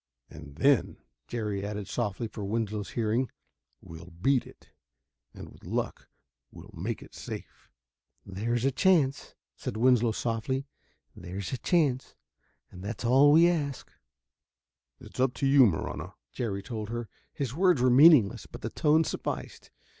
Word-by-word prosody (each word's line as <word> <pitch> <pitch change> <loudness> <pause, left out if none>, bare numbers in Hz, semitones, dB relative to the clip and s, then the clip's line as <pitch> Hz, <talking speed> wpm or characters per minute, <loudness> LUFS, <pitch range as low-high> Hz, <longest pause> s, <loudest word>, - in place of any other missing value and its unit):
"And 70 -2 -11
then," 135 - +2 0.3
Jerry 105 -4 -3
added 105 -1 -5
softly 115 -1 -2
for 105 -1 -8
Winslow's 105 -1 -2
hearing, 115 +2 0 0.5
"we'll 80 +2 -11
beat 115 +10 0
it. - - -18 0.6
And, - - -11
with - - -18
luck, - - -4 0.4
we'll - - -13
make - - -4
it - - -16
safe." - - -9 0.6
"There's 115 +6 -2
a 135 - +3
chance," 140 -2 +1 0.2
said 110 - -5
Winslow 120 -1 +3
softly, 120 +4 -2 0.5
"there's 90 +3 -6
a 130 - -3
chance 145 -8 0 0.6
and 90 - -11
that's 110 +3 -5
all 135 +4 +6
we 165 +3 +7
ask." 145 -6 -2 1.1
"It's - - -13
up 130 -1 +2
to - - -2
you, 135 -2 +6
Marahna," 80 -6 -4 0.2
Jerry 100 -5 -3
told 110 -4 -5
her. 120 0 -4 0.2
His 130 -4 -4
words 180 -1 +3
were 125 0 +3
meaningless, 125 - +6
but - - -11
the 110 - -4
tone 155 0 +3
sufficed. - - -5
120 Hz, 145 wpm, -28 LUFS, 105-135 Hz, 1.1 s, we